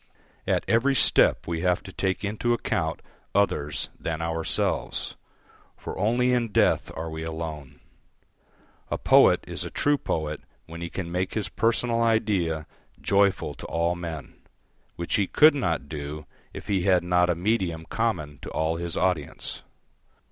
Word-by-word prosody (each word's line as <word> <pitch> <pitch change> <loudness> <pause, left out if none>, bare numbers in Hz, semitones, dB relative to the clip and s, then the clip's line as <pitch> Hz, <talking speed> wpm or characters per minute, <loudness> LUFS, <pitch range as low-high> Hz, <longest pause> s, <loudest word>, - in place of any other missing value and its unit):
At - - +1
every 130 +5 +3
step - - +5
we 85 -1 -3
have 90 0 +1
to 95 - -10
take 95 +1 -1
into 110 +3 0
account 80 -8 -2 0.3
others 75 -8 +1
than 80 -1 -3
ourselves. 80 0 -1 0.6
For - - -7
only 120 +5 +2
in 120 -3 0
death - - +2
are 80 0 -4
we 80 0 -5
alone. 80 -3 -6 1.1
A - - -1
poet - - +5
is - - -4
a - - -5
true 145 0 +1
poet 75 -1 -2 0.2
when 85 +1 -9
he 85 - -4
can 85 -2 -5
make 90 +1 -2
his 105 -3 -1
personal 115 +1 +1
idea 100 -9 +1 0.3
joyful 100 0 +2
to - - -10
all 85 +1 0
men, 85 -4 -6 0.6
which 85 - -1
he 100 -2 +1
could 155 +1 +6
not 85 - -1
do 75 0 -6 0.3
if - - -9
he 95 -2 +1
had 90 -1 +3
not 90 0 +3
a 90 - +2
medium 90 -3 -1
common 75 - -2
to - - -7
all 80 +1 -1
his 85 0 -3
audience. 90 -5 -1
90 Hz, 155 wpm, -26 LUFS, 80-105 Hz, 1.1 s, could